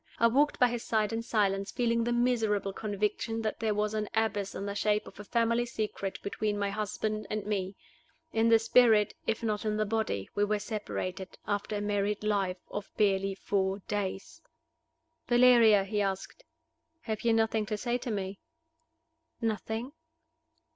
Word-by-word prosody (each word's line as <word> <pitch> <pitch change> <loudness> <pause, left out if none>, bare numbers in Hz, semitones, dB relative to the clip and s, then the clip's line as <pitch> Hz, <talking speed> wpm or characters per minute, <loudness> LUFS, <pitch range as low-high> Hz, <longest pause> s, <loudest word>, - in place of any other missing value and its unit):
I 230 - +3
walked 280 +6 +3
by 250 - +5
his 240 -1 -3
side 220 -1 0
in 225 - -1
silence, 200 -4 0
feeling 235 -2 +1
the 240 - 0
miserable 225 -5 +1
conviction 210 +2 -2
that 215 - -2
there 220 -2 0
was 210 +1 0
an 215 -1 -2
abyss 220 -3 0
in 200 - -4
the 200 - -3
shape 210 +1 +1
of - - -13
a - - -6
family 230 +2 +1
secret 210 -4 -3
between 205 +1 -1
my 200 -1 -1
husband 215 +1 -3
and 215 -1 -3
me. 195 -2 -2 0.6
In 225 +1 +3
the 225 - +7
spirit, 225 -2 +4
if 225 +1 -1
not 210 -2 -1
in 215 -1 0
the 215 - +1
body, 210 - -1
we 205 - +1
were 210 +1 +1
separated, 200 -3 -5
after 205 +1 -2
a 205 - -2
married 205 0 -1
life 195 -3 0
of 205 0 -5
barely 195 -1 +2
four 190 0 0
days. 195 -2 -3 0.9
"Valeria," 240 -4 +6
he 205 +1 -1
asked, 195 - -3 0.6
"have 220 -5 -3
you 235 - +2
nothing 225 -1 +1
to 215 - -2
say 240 +3 -1
to 245 - -5
me?" 195 -2 -3 1.0
"Nothing." 225 +2 -2
210 Hz, 170 wpm, -30 LUFS, 200-225 Hz, 1.0 s, the